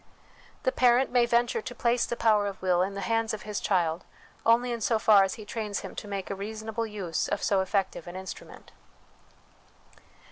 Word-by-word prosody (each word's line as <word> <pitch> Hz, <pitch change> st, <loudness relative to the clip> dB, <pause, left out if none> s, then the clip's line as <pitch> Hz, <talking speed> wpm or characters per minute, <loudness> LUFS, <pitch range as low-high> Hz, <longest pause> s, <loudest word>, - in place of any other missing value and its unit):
The -, -, +2 dB
parent 250 Hz, -, +3 dB
may 245 Hz, -1 st, +3 dB
venture 235 Hz, -1 st, +1 dB
to 245 Hz, -, -7 dB
place 235 Hz, 0 st, +1 dB
the 240 Hz, -, -2 dB
power 215 Hz, -3 st, +3 dB
of 200 Hz, -, -6 dB
will 180 Hz, -1 st, +2 dB
in 195 Hz, +2 st, -1 dB
the 200 Hz, -, -4 dB
hands 225 Hz, +2 st, 0 dB
of 210 Hz, -, -11 dB
his 210 Hz, -1 st, -3 dB
child 175 Hz, -3 st, 0 dB, 0.4 s
only 240 Hz, +2 st, +4 dB
in 235 Hz, -1 st, -3 dB
so 225 Hz, +1 st, +2 dB
far 210 Hz, -2 st, +6 dB
as 195 Hz, -, -1 dB
he 215 Hz, -, -10 dB
trains 210 Hz, -2 st, -4 dB
him -, -, -8 dB
to -, -, -7 dB
make 200 Hz, -1 st, -4 dB
a -, -, -2 dB
reasonable 220 Hz, +3 st, -4 dB
use 195 Hz, -6 st, -3 dB
of 205 Hz, -, -2 dB
so 195 Hz, -2 st, +2 dB
effective 190 Hz, -3 st, -2 dB
an 175 Hz, -, -8 dB
instrument. 190 Hz, 0 st, -9 dB
210 Hz, 200 wpm, -28 LUFS, 195-230 Hz, 0.4 s, far